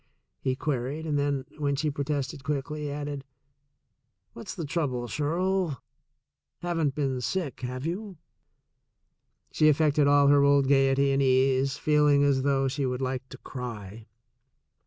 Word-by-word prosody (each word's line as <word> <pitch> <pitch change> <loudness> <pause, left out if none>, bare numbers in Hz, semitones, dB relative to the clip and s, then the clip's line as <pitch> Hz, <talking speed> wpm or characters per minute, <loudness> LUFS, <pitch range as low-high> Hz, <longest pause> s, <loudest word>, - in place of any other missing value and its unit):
he 130 -1 -1
queried, 140 +2 -3
and 150 -2 0
then, 140 -2 -1
when 140 -1 0
she 150 +2 -1
protested 140 -1 -3
quickly, 150 +1 -3
added: 145 -1 -5 1.1
"What's 115 - -8
the 165 - -4
trouble, 140 -6 -2
Shirl? 170 +1 -1 0.8
Haven't 165 -5 0
been 135 -4 -1
sick, 165 +2 -3
have 130 +2 -4
you?" 190 +2 -4 1.3
She 155 - +4
affected 150 -1 +3
all 145 0 +5
her 145 0 +6
old 140 -1 +4
gaiety 135 0 +3
and 135 0 +2
ease, 135 +1 +2
feeling 150 -2 +3
as 140 -2 +3
though 135 0 +1
she 140 +2 -2
would 125 +1 -2
like 130 0 -3
to - - -10
cry. 110 -4 -8
140 Hz, 135 wpm, -27 LUFS, 130-150 Hz, 1.3 s, her